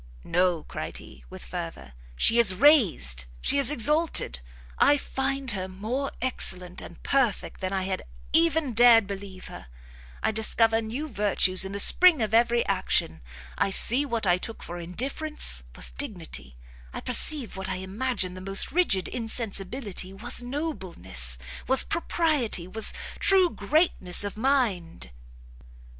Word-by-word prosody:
"No," 175 -2 0
cried - - -7
he, 65 0 -14
with - - -11
fervour, 65 +1 -8 0.2
"she 230 - +4
is 200 -6 +3
raised, 180 - +3
she 280 - +1
is 275 - +5
exalted! 300 - +2 0.4
I 290 - +4
find 270 -1 -3
her 190 -2 -4
more 220 +9 -4
excellent 185 -8 -1
and 170 - -13
perfect 255 -7 -1
than 185 0 -3
I 190 -1 -2
had 190 0 -3 0.3
even 320 -5 +2
dared 230 -1 +6
believe 195 -1 -9
her; - - -11 0.6
I - - +1
discover 225 +1 +2
new 240 +8 -5
virtues 200 -6 +2
in 190 - -6
the 200 - -5
spring 350 - +5
of 215 0 -4
every 235 +1 +2
action; 80 0 -1 0.4
I - - +1
see 245 +7 +6
what 235 -6 -3
I 180 -1 +2
took 225 +4 -6
for 175 +1 -7
indifference, 225 - -2
was - - -1
dignity; 60 +1 -5 0.4
I - - -6
perceive 255 0 +2
what 190 0 -6
I 190 - -2
imagined 190 0 -2
the 185 - -9
most 195 +1 +2
rigid 275 - +1
insensibility, 220 -3 -2
was 235 +5 -3
nobleness, 185 - -3 0.3
was 265 0 +4
propriety, 305 - -1
was 220 +3 +2 0.3
true 375 -3 +4
greatness 295 - 0
of 205 - -5
mind!" 215 - -1
215 Hz, 145 wpm, -25 LUFS, 185-265 Hz, 0.6 s, dared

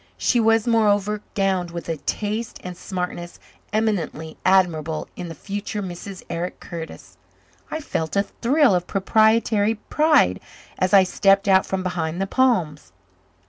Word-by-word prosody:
She 245 - +2
was, 225 -1 +3
moreover, 210 -3 +2
gowned 190 -3 0
with 170 0 -7
a 165 -1 -2
taste 215 +9 -3
and 180 -1 -6
smartness 180 -1 -5 0.3
eminently 190 -7 -2
admirable 165 -5 +2
in 175 -2 -6
the 165 - -8
future 205 +5 -5
Mrs. 185 +1 -8
Eric 175 +2 -4
Curtis. 165 -1 -9 0.5
I 315 - -4
felt 160 - -3
a 200 - +3
thrill 265 +3 +2
of 180 -1 0
proprietary 220 +1 +2
pride 305 +8 +2 0.4
as 185 0 +1
I 195 -2 +7
stepped 195 +2 +2
out 190 -1 +4
from 190 -1 -2
behind 175 -2 -2
the 195 - 0
palms. 185 - 0
195 Hz, 140 wpm, -22 LUFS, 175-215 Hz, 0.5 s, I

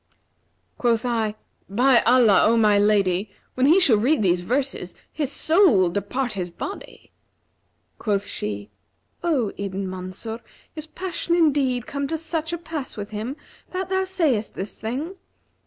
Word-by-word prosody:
Quoth 235 -1 +1
I, 225 -3 0 0.3
'By 245 +4 +4
Allah, 235 -5 +6
O 230 +1 +3
my 210 -2 +4
lady, 200 -1 +2 0.2
when 255 +1 +2
he 335 +6 +6
shall 265 - +5
read 250 +3 +2
these 180 -2 +2
verses, 250 -3 -2 0.2
his 290 -3 -2
soul 330 - +4
will 185 -2 +3
depart 235 +6 -2
his 180 -3 -3
body!' 390 - -8 0.9
Quoth 205 -2 0
she, 105 0 -5 0.5
'O 290 - +1
Ibn 195 -1 -3
Mansur, 185 +5 -5 0.4
is 310 0 -6
passion 350 0 -2
indeed 275 -7 +2
come 280 0 -3
to 320 - -2
such 320 0 -3
a 340 - -2
pass 320 -7 -6
with 205 0 -6
him 220 +7 -4 0.3
that 370 0 -4
thou 380 0 +1
sayest 320 - 0
this 195 - -4
saying?' 280 - -4
240 Hz, 150 wpm, -23 LUFS, 205-310 Hz, 0.9 s, Allah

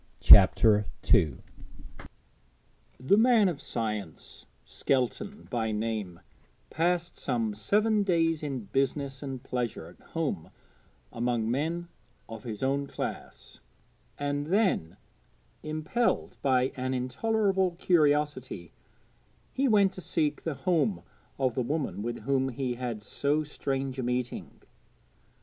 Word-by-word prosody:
CHAPTER 105 -2 +7 0.3
II 75 -5 +3 1.6
The 130 +11 +3
man 225 -2 +5
of 165 -6 -3
science, 105 -8 -5 0.2
Skelton 140 - -2
by 115 -3 -1
name, 105 -5 -3 0.5
passed 175 +1 0
some 115 -5 -1
seven 210 - +2
days 165 -5 +1
in 140 -4 -3
business 135 +5 -2
and 135 -3 -6
pleasure 120 -9 -3
at 85 - -16
home 145 - -2 0.6
among 115 -1 -1
men 165 +6 -2 0.4
of 115 +1 -9
his 110 -1 -5
own 140 +1 0
class, - - -7 0.6
and 145 0 -2
then, 185 - +1 0.6
impelled 155 +10 -1
by 130 -1 +2
an 130 0 -2
intolerable 190 - 0
curiosity, 145 - +1 0.8
he 275 +1 +1
went 200 -5 +4
to 185 - -9
seek 150 -4 -1
the 160 -3 -3
home 180 +8 0 0.3
of 130 -3 +1
the 130 - -1
woman 140 -4 -2
with 120 +1 -4
whom 135 +2 +1
he 130 0 -2
had 120 -3 -5
so 145 +7 0
strange 135 -2 -3
a - - -1
meeting. 125 0 -3
135 Hz, 115 wpm, -28 LUFS, 120-165 Hz, 1.6 s, CHAPTER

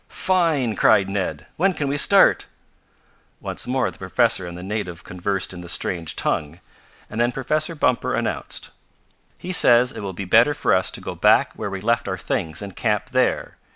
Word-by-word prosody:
"Fine!" 160 - 0
cried 95 +1 +4
Ned. 95 -7 -3
"When 190 +3 +2
can 145 -4 -3
we 140 - -1
start?" 145 - +4 0.9
Once - - -5
more 130 +1 0
the - - -18
professor 95 0 +1
and 85 0 -8
the 90 - -9
native 95 -3 -5
conversed 90 +2 -3
in 90 - -9
the 85 - -8
strange 85 -2 0
tongue, 75 +4 -2 0.5
and 105 - -7
then 120 +1 +2
Professor 155 +6 -1
Bumper 125 -5 0
announced: - - -3 0.7
"He 185 - -6
says 125 -7 +5
it - - -8
will 100 -1 -5
be 95 +2 -6
better 115 +10 +4
for - - +1
us 95 0 +2
to - - -6
go - - -6
back - - +3
where - - -5
we 95 -1 -6
left 115 +2 0
our - - -3
things 80 +4 -3
and 100 -3 -9
camp 105 0 -1
there. 130 0 0
105 Hz, 190 wpm, -22 LUFS, 95-130 Hz, 0.9 s, says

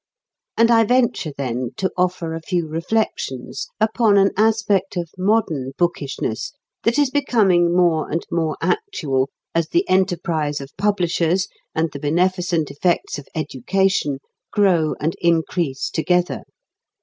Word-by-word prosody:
And 230 +1 +5
I 225 -1 +6
venture, 235 -8 +1
then, 125 -2 -3
to 190 - -1
offer 180 -2 -1
a 165 - -5
few 170 -1 -1
reflections 165 - -2
upon 220 -1 +3
an 195 0 +4
aspect 210 -2 +1
of 170 -2 -3
modern 185 -9 0
bookishness 140 - -2 0.3
that 235 +3 +1
is 290 -3 +3
becoming 200 -11 +3
more 170 -3 +2
and 165 +2 -2
more 160 -2 0
"actual" 150 - 0 0.2
as 165 -1 0
the 350 +3 +1
enterprise 170 -5 0
of 135 0 -10
publishers 185 -3 +1 0.3
and 160 -1 0
the 140 - -7
beneficent 175 0 0
effects 160 +1 0
of 140 - -12
education 155 +1 0 0.3
grow 180 -7 +2
and 160 +3 -1
increase 165 -4 0
together. 180 +2 0
175 Hz, 130 wpm, -21 LUFS, 155-200 Hz, 0.3 s, I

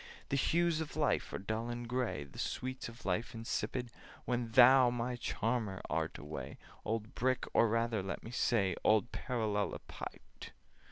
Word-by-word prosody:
The 140 - +1
hues 165 +3 +2
of 155 - -5
life - - +1
are - - -2
dull 110 +4 -3
and 120 0 -4
gray, 120 - -1
The 70 - -12
sweets 130 -1 -3
of 115 - -13
life 100 +5 -1
insipid, 115 +1 -2 0.3
When 120 -2 -1
thou, 130 0 +8
my 120 +1 -2
charmer, 115 -4 -1
art - - -1
away— 75 +1 -7 0.3
Old 110 0 -2
Brick, 130 +1 +1
or 115 - +5
rather, 115 -1 +1
let 95 +1 -4
me 115 - -8
say, 105 -7 +2
Old 110 +3 +4
Parallelepiped! 105 - -4
115 Hz, 155 wpm, -34 LUFS, 110-125 Hz, 0.3 s, thou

